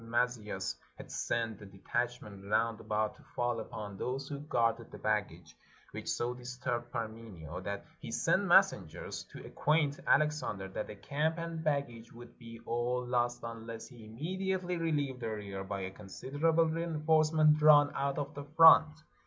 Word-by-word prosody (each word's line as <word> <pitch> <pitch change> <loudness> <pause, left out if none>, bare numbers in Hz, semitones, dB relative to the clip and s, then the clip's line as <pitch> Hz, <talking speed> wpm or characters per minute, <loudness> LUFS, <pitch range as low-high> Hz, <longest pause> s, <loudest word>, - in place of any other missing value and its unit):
Maz£eus 115 -4 -1 0.2
had - - -10
sent 115 -3 -2
a - - -9
detachment 100 0 -4
round 115 +1 +1
about 105 0 -1
to - - -18
fall 120 -1 0
upon 105 -2 -7
those 130 +2 -3
who 140 -1 -5
guarded 115 -5 0
the - - -10
baggage, 90 -7 -2 0.4
which - - -6
so 120 +1 -1
disturbed 120 -1 -4
Parmenio, 110 -8 -6
that 100 +1 -5
he - - -8
sent - - +2
messengers - - +2
to - - -11
acquaint 150 -2 +1
Alex 150 +1 +3
ander 95 -2 -4
that 100 - -4
the 105 - -8
camp 150 - -1
and 165 -1 -4
baggage 140 -7 -2
would 120 +1 -13
be 115 -1 -10
all 125 +1 -1
lost 120 0 0
un 115 -1 -7
less 115 -1 -7
he 120 -4 -14
immediately 180 - -2
relieved 145 -6 -1
the 115 -2 -3
rear 100 -3 -5
by 100 0 -4
a 95 0 -4
considerable 145 +12 0
reinforcement 155 -1 +3
drawn 150 -1 +7
out 140 0 -1
of 145 0 -3
the 145 - -6
front. 160 -1 +8
120 Hz, 160 wpm, -32 LUFS, 110-150 Hz, 0.4 s, front